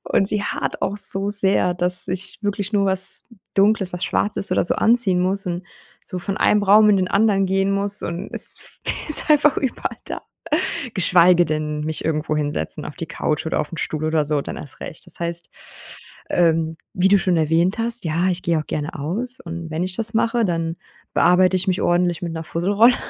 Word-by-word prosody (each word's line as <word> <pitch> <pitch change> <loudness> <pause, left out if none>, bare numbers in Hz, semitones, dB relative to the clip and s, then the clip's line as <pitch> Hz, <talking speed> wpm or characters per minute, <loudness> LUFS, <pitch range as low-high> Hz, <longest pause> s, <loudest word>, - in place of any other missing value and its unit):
Und 195 - +1
sie 210 -1 -1
haart - - -4
auch 200 +2 -1
so 200 -1 0
sehr, 195 -3 +1
dass 180 +1 +3
ich 185 +1 -5
wirklich 205 0 -3
nur 200 -1 +2
was 190 0 +2 0.3
Dunkles 200 -2 +2
was 180 +1 -3
Schwarzes 205 -1 0
oder - - +2
so - - +6
anziehen 220 -6 +4
muss 190 +1 +3
und 175 +1 -4 0.4
so 185 - -6
von 195 +2 -4
einem 210 -1 +2
Raum 210 +2 +6
in 200 - +3
den 185 -1 -1
anderen 200 -2 +2
gehen 195 +1 0
muss 200 +1 +3
und 170 +4 -5
es - - -1 0.3
ist 305 - +5
einfach 295 -1 +4
überall 265 - -3
da - - -6 0.7
geschweige 175 -1 +4
denn, 150 -1 -3
mich 155 +1 -5
irgendwo 155 -1 -1
hinsetzen 150 +1 -3
auf 150 - -8
die 165 - -6
Couch 155 0 -2
oder - - -1
auf 150 - -6
´n 165 - -6
Stuhl 155 0 -3
oder 155 -1 +1
so, 145 -1 0
dann - - -7
erst 145 - -11
recht. - - -9
Das - - -2
heißt, 170 0 -2 0.8
ähm, 165 -2 +1 0.2
wie 185 +1 +2
du 200 0 +5
schon 180 -1 0
erwähnt 165 +6 +1
hast: 235 -2 0
„Ja, 165 +4 0
ich 180 0 -2
gehe 170 -2 0
auch - - -9
gerne 150 +1 -4
aus”, 215 - -3
und 170 -1 -7
wenn 160 +2 -3
ich 185 0 -4
das 225 0 -4
mache, 230 +1 +1
dann 165 -2 -2 0.4
bearbeite 185 +1 +4
ich 185 +2 -2
mich 185 +2 0
ordentlich 175 0 +1
mit 170 - -4
´ner 160 - -5
Fusselrolle. 205 +10 +3
185 Hz, 205 wpm, -21 LUFS, 165-200 Hz, 0.8 s, so